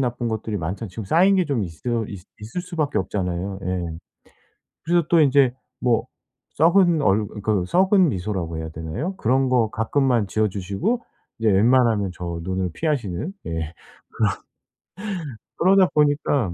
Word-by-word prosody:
나쁜 120 -2 -1
것들이 110 -1 -3
많잖아 95 +5 -4
지금 100 +4 -7
쌓인 185 - +4
게 185 - +3
좀 140 -8 -1
있어 110 +7 -3
있 100 -3 -7 0.2
있을 115 +12 -5
수밖에 155 - -1
없잖아요. 95 0 -3
예. 85 -3 -3 0.9
그래서 170 -1 +2
또 170 -2 +5
이제 135 -3 +4 0.3
뭐 120 0 +1 0.5
썩은 170 -1 +4
얼 105 0 +2 0.2
그 105 -5 +1
썩은 185 - +4
미소라고 90 -4 -3
해야 80 0 -4
되나요? 80 - -5
그런 130 -1 +2
거 120 -4 +2
가끔만 120 -2 +1
지어 110 -1 +1
주시고 100 - -2 0.4
이제 110 -1 +2
웬만하면 110 -2 +3
저 85 -1 -5
눈을 95 -1 -2
피하시는 140 - -2
예 - - -4 2.1
그런. 190 +3 +4
그러다 190 -2 +5
보니까 145 - +2
115 Hz, 300 characters per minute, -23 LUFS, 95-150 Hz, 2.1 s, 또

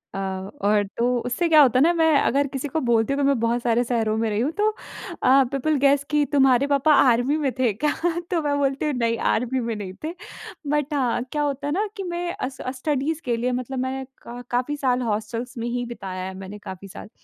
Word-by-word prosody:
अ, - - -3
और 195 +2 -1
तो 245 +1 +2
उससे 250 +8 0
क्या 310 -2 +7
होता 255 -2 +5
है - - +5
ना 335 - +5
मैं 325 -1 +3
अगर 280 +2 +2
किसी 270 +1 -4
को 315 +3 -2
बोलती 235 +1 +2
हूँ 285 - -1
कि - - +2
मैं 275 -4 +2
बहुत 235 +1 0
सारे 240 0 +2
शहरों 225 -3 0
में 225 0 0
रही 210 +1 -1
हूँ 270 +6 0
तो 420 +1 +3 0.5
अ, 270 +1 +6
पीपल 285 +3 0
गैस 280 +1 +3
कि 295 0 +3
तुम्हारे 270 -1 +4
पापा 285 +2 +3
आर्मी 250 +2 +4
में 285 -4 0
थे 245 -4 +3
क्या? 295 +9 0 0.4
तो 340 -2 +1
मैं 290 -1 0
बोलती 275 +1 0
हूँ, 300 - 0
"नहीं, 230 -2 0
आर्मी 250 +3 0
में 230 -2 -2
नहीं 195 -3 -6
थे।" 320 +2 -3 0.5
बट 295 0 0
हाँ, 255 -4 0
क्या 300 - -1
होता 285 -1 -2
है 290 - -1
ना 405 +5 0
कि 395 - -3
मैं 345 -1 -3
अस 260 0 -5 0.2
स्टडीज़ 295 +3 -1
के 240 - +1
लिए 245 +2 -1
मतलब 255 +1 -3
मैं 260 +1 -3 0.2
का 240 +1 -8
काफ़ी 250 +4 0
साल 255 -2 +1
हॉस्टलस 230 +2 -3
में 230 0 -3
ही 245 0 -2
बिताया 195 -6 -6
है, 190 - -5
मैंने 195 +2 -8
काफ़ी 190 +1 -8
साल। 195 - -10
255 Hz, 235 wpm, -23 LUFS, 230-285 Hz, 0.5 s, क्या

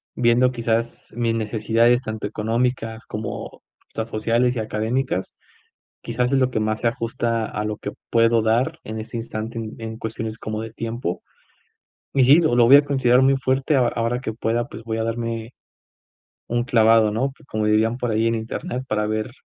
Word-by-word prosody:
viendo 125 +1 +3
quizás 115 -1 -2
mis 115 -1 0
necesidades 115 +2 +2
tanto 110 -4 -5
económicas 115 +2 -2
como 105 +1 -6 0.3
estas 110 0 -5
sociales 115 +3 +1
y 115 - -2
académicas, 110 0 -2 0.7
quizás 125 +1 -1
es 135 - +4
lo 130 -1 +2
que 110 - -1
más 110 0 -1
se 115 - +3
ajusta 115 -1 -1
a 105 - -4
lo 105 0 -3
que 105 - -5 0.2
puedo 115 0 +4
dar 125 +9 +1
en 110 0 -5
este 110 +2 -7
instante 115 0 -5
en 110 -1 -5
en 110 -1 -6
cuestiones 110 -1 -5
como 110 -1 -4
de 115 0 -6
tiempo. 115 -6 -4 0.9
Y 135 -2 +4
sí, 140 +6 +7
lo 155 -7 +2
lo 120 -1 +6
voy 135 +3 +10
a 145 - +3
considerar 130 -3 +3
muy 135 +1 +4
fuerte 130 +3 +1
a 125 -3 +4
ahora 115 +2 -1
que 110 - -3
pueda, 115 +1 -1
pues 115 - -9
voy 110 0 -3
a 110 - -1
darme 115 0 -3 1.0
un 120 0 0
clavado, 115 -3 +4
¿no? 130 +5 0 0.2
Como 110 -1 -1
dirían 110 +2 +2
por 120 -2 -2
ahí: 110 +1 +1
"En 115 - +2
internet" 115 +3 -4
para 105 0 0
ver 110 +2 -2
115 Hz, 185 wpm, -22 LUFS, 110-125 Hz, 1.0 s, voy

